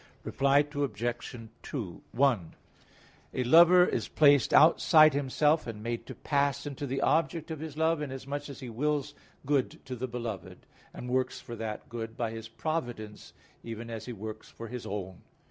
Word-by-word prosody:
Reply 140 +2 +3
Obj. 120 -4 -3 0.8
1: 120 -10 +1 0.8
A 130 - +1
lover 170 +7 +7
is - - -2
placed 145 -3 +4
outside 155 -1 +7
himself, 145 +3 +1
and 105 -2 -6
made 120 0 -4
to - - -7
pass 140 -2 0
into 145 0 -5
the 135 +1 -2
object 160 +1 +1
of 160 - -5
his 155 -1 -7
love, 160 0 +2
inasmuch 140 +1 -5
as 140 - -9
he 125 - -6
wills 145 +4 -1 0.3
good 140 -2 0
to 130 - -5
the 130 +2 -4
beloved; 120 -6 -6 0.3
and 125 - -8
works 130 0 0
for 120 - -8
that 110 -2 -5
good 115 -1 -6
by 115 -2 -1
his 115 0 -7
providence 120 -7 -4 0.3
even 115 0 -7
as 110 -1 -6
he - - -4
works 110 +1 -8
for 115 -1 -9
his 125 -1 -6
own. 95 -2 -5
130 Hz, 165 wpm, -29 LUFS, 115-145 Hz, 0.8 s, lover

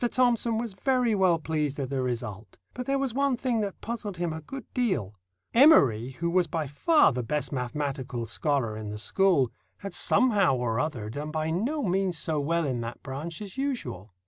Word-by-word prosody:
Thomson 240 -3 +2
was 230 -2 -3
very 250 +3 +1
well 185 -4 +4
pleased 150 -3 -2
at 135 -1 -3
the 135 -1 0
result; 115 -5 -4 0.2
but 250 0 -6
there 275 0 +2
was 270 -4 -1
one 275 -1 +1
thing 245 -2 0
that 200 -2 -3
puzzled 210 -5 -5
him 170 -2 -1
a 160 - -6
good 265 - -8
deal—Emory, 115 - +3
who 170 +5 -2
was 180 -1 +3
by 155 0 -2
far 300 - +4
the 125 - -1
best 140 +2 -2
mathematical 130 -2 -3
scholar 120 -1 -1
in 110 -1 -6
the 105 - -5
school, 155 - +2 0.3
had 195 -2 -7
somehow 200 - +3
or 120 -2 -1
other 130 -8 -2
done 145 +5 -5
by 155 +1 -1
no 260 - -1
means 185 -2 0
so 155 -2 -1
well 165 +3 0
in 125 -4 -1
that 115 +1 -7
branch 155 +8 -5
as 200 +2 -10
usual. 125 - -4
160 Hz, 190 wpm, -27 LUFS, -, 0.3 s, well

